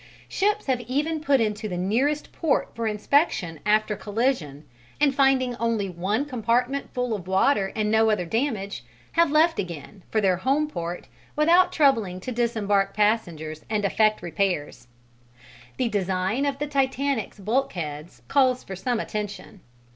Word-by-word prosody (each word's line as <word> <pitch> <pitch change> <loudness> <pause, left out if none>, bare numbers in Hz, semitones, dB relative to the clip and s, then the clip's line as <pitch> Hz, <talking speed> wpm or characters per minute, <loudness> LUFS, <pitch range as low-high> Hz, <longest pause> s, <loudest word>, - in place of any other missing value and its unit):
Ships 420 +2 0
have 255 -3 0
even 300 +5 -1
put 280 -3 +3
into 215 -1 -1
the 180 - -3
nearest 250 +11 0
port 315 -4 0
for 230 -1 -3
inspection 210 - +1
after 215 0 +2
collision, 205 - -2 0.3
and 290 -2 +3
finding 265 -2 +2
only 225 -5 -1
one 195 +10 -1
compartment 250 +1 -1
full 250 -2 -2
of 185 -4 -5
water 195 +1 +2
and 215 -1 0
no 220 0 +4
other 210 -5 +1
damage, 220 -1 -2 0.3
have 335 -1 +3
left 320 +3 +3
again, 180 +2 -6
for 220 - +1
their 190 -3 +2
home 275 +9 +1
port 175 - -5 0.3
without 345 +4 +4
troubling 225 - +2
to 255 - -5
disembark 205 -5 0
passengers 170 -8 0
and 210 -2 0
effect 215 0 +2
repairs. 165 -8 -2 0.9
The 255 - +1
design 195 +5 0
of 275 -1 -1
the 295 - -2
Titanic's 275 -5 -1
bulkheads 180 - -3
calls 255 -3 +2
for 190 - -7
some 235 +5 -1
attention. 210 -2 -6
220 Hz, 145 wpm, -25 LUFS, 195-275 Hz, 0.9 s, no